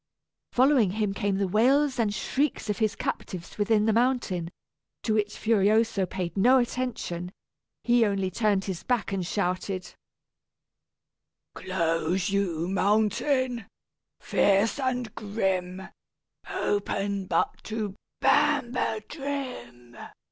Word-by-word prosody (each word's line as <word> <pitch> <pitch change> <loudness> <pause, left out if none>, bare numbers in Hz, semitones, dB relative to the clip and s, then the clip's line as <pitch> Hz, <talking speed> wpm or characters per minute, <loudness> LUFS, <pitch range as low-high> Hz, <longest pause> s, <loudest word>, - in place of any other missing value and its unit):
Following 255 -7 +4
him 210 -2 0
came 200 -1 -1
the 195 -1 0
wails 260 +7 +3
and 220 -3 +2
shrieks 255 +2 -1
of 205 - -4
his 220 -1 +1
captives 180 -2 -5
within 210 0 +3
the 220 - +3
mountain, 230 -8 +1 0.5
to 220 - +1
which 210 -1 0
Furioso 215 -2 +2
paid 180 -1 -4
no 245 +7 +5
attention; 240 -8 -2 0.5
he 240 -1 +4
only 195 -3 0
turned 205 -1 +1
his 190 -3 -4
back 245 -5 -1
and 195 -2 -1
shouted: 185 0 -2 1.6
"Close 175 +1 -1
you, 175 -5 0
mountain, 220 +5 +1 0.5
fierce 200 +5 +2
and 250 -4 -2
grim, 190 -3 -2 0.6
Open 200 -1 -1
but - - 0
to 215 -3 -3 0.3
Banbedrim!" 260 - -1
210 Hz, 105 wpm, -27 LUFS, 190-240 Hz, 1.6 s, no